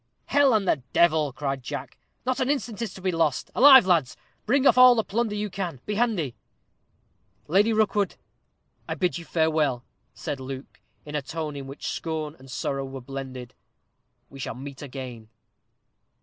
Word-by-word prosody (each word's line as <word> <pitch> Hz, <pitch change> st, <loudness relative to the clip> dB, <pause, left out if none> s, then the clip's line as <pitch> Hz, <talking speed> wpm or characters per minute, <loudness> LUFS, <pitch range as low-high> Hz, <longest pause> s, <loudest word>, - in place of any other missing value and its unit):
"Hell 285 Hz, -1 st, +4 dB
and 200 Hz, -3 st, +1 dB
the 140 Hz, -, +2 dB
devil!" 155 Hz, -4 st, +3 dB
cried 135 Hz, 0 st, -3 dB
Jack; 145 Hz, +3 st, -7 dB, 0.3 s
"not 255 Hz, +1 st, 0 dB
an 260 Hz, 0 st, 0 dB
instant 245 Hz, -7 st, -2 dB
is 225 Hz, -5 st, -2 dB
to 190 Hz, -, -11 dB
be 185 Hz, -, +1 dB
lost. 160 Hz, -5 st, 0 dB
Alive, 265 Hz, -3 st, +9 dB
lads; 170 Hz, -8 st, +2 dB, 0.3 s
bring 275 Hz, +1 st, +3 dB
off -, -, +6 dB
all 250 Hz, -1 st, +8 dB
the 225 Hz, -, +1 dB
plunder 215 Hz, +1 st, -1 dB
you 210 Hz, 0 st, -2 dB
can; 180 Hz, -7 st, -5 dB
be 210 Hz, -, -2 dB
handy!" 205 Hz, -, 0 dB, 1.1 s
"Lady 200 Hz, +7 st, +3 dB
Rookwood, 210 Hz, -2 st, +1 dB, 0.7 s
I -, -, -1 dB
bid 180 Hz, -2 st, 0 dB
you 170 Hz, -, -10 dB
farewell," 155 Hz, -7 st, +1 dB, 0.3 s
said 140 Hz, -, -4 dB
Luke, 130 Hz, 0 st, -8 dB, 0.2 s
in 150 Hz, -, -8 dB
a 150 Hz, -, -1 dB
tone 155 Hz, +1 st, -5 dB
in 135 Hz, -1 st, -7 dB
which 135 Hz, +1 st, -9 dB
scorn 155 Hz, -2 st, -4 dB
and 135 Hz, 0 st, -15 dB
sorrow 135 Hz, +1 st, -2 dB
were 135 Hz, 0 st, -7 dB
blended. 130 Hz, -1 st, -7 dB, 0.7 s
"We 135 Hz, -, -13 dB
shall 125 Hz, -, -4 dB
meet 135 Hz, +2 st, -9 dB
again." 125 Hz, -5 st, -8 dB
160 Hz, 170 wpm, -25 LUFS, 135-210 Hz, 1.1 s, Alive